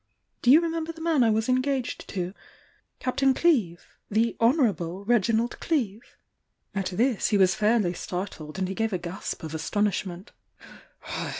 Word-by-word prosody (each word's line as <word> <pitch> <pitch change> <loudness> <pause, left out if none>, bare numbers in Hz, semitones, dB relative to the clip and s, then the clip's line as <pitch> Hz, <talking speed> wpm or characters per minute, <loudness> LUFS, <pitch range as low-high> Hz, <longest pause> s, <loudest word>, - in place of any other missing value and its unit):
Do 245 - +2
you 300 +6 +8
remember 330 -1 -2
the 325 - -13
man 320 -4 +2
I 230 - +4
was 220 0 +1
engaged 255 0 -1
to?— 180 -2 -3 0.7
Captain 265 +1 +1
Cleeve?— 225 - +2 0.2
the 225 +2 +1
'Honourable' 210 - +1
Reginald 230 +1 +1
Cleeve?" 235 - -2 0.6
At 195 -2 -1
this 225 +5 +1
he 210 - +2
was 190 -1 +4
fairly 210 -4 +2
startled 180 -3 -6
and 190 -1 -1
he 190 - -3
gave 225 +1 -1
a - - +1
gasp 175 0 -6
of 160 -1 -6
astonishment. 190 +2 -2
220 Hz, 145 wpm, -26 LUFS, 185-255 Hz, 0.7 s, you